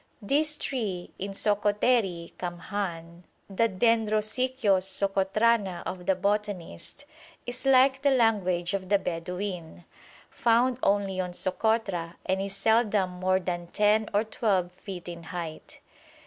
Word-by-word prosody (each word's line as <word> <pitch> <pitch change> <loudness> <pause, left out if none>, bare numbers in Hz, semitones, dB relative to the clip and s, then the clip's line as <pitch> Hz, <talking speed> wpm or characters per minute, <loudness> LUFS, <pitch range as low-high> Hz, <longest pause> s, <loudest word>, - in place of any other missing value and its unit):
This 300 +7 +2
tree, 210 -12 -3
in 195 +1 -4
Sokoteri 205 -3 +1
kamhàn, 175 -1 -5 0.3
the 225 +4 +1
Dendrosicyos 220 +1 +2
Socotrana 195 +1 +1
of 180 -1 -6
the 190 - +4
botanist, 205 +5 -3 0.4
is 245 +2 -3
like 265 0 +5
the 285 - +3
language 200 -9 +2
of 190 -2 -3
the 200 - +5
Bedouin, 180 -1 -5 0.5
found 240 +2 +2
only 195 -2 +1
on 180 -1 -2
Sokotra, 185 -3 0
and 190 +1 0
is 195 0 -3
seldom 215 -3 +2
more 185 +1 +1
than 175 -1 -4
10 210 +3 +2
or 205 +1 +2
12 200 -5 0
feet 180 -1 -9
in 170 -1 -7
height. 170 -2 -7
195 Hz, 120 wpm, -27 LUFS, 180-220 Hz, 0.5 s, like